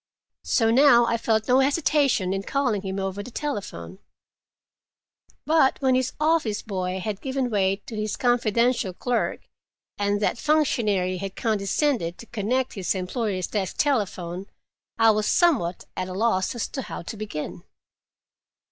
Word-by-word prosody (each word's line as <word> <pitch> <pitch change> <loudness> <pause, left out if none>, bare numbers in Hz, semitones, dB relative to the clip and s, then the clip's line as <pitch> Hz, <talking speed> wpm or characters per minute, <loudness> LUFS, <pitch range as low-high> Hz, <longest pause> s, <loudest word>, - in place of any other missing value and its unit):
So 225 -2 +2
now 240 -1 +6
I 235 - +1
felt 220 -1 0
no 255 +1 +5
hesitation 275 - +2
in 195 - -2
calling 245 -2 0
him 190 0 -4
over 195 +1 -3
the 245 - -9
telephone. 195 - -5 1.5
But 305 -2 +3
when 265 -2 +2
his 255 0 +1
office 305 -9 +1
boy 185 -2 -3
had 200 +1 -4
given 265 -2 -2
way 195 -2 +2
to 225 - -7
his 215 0 -2
confidential 235 -3 +1
clerk, 245 +5 -1 0.6
and 205 0 +1
that 215 +3 0
functionary 215 -12 +1
had 195 +1 -6
condescended 215 - 0
to - - -11
connect 240 +4 -1
his 190 -1 -1
employer's 190 0 -2
desk 195 -3 -3
telephone, 195 - -1 0.5
I 225 -1 +6
was 215 0 0
somewhat 260 - +2
at 185 0 -3
a - - -5
loss 195 0 0
as 240 - -2
to 270 - -4
how 220 - -7
to 195 - -6
begin. 205 -7 -6
215 Hz, 145 wpm, -25 LUFS, 190-255 Hz, 1.5 s, now